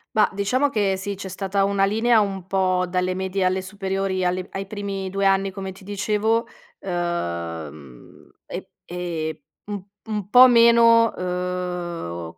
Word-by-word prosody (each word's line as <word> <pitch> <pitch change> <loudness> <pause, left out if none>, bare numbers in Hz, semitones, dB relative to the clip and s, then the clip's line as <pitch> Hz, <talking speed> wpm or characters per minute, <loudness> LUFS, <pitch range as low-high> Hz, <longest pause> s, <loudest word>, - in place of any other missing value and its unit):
Mah, 215 -1 +4
diciamo 250 +9 +1
che 200 -6 0
sì, 200 +2 -4
c'è 195 0 -7
stata 195 +1 -1
una 200 0 +1
linea 225 +3 +3
un 195 -3 -3
po' 185 -1 +1
dalle 180 0 0
medie 190 +1 -2
alle 185 +1 +1
superiori, 190 -1 -2
alle 180 +1 -1
ai 195 0 -4
primi 195 -1 -4
2 195 +1 -1
anni, 195 0 +2
come 190 0 -6
ti 190 +1 -15
dicevo, 210 +3 0 0.3
uhm, 85 - -5 0.2
e - - -7 0.2
e 165 -3 -4 0.2
un 205 -2 -5 0.2
un 210 -3 -4
po' 250 +3 +9
meno, 230 -1 +6
uhm, 180 - -4
190 Hz, 145 wpm, -23 LUFS, 180-205 Hz, 0.3 s, po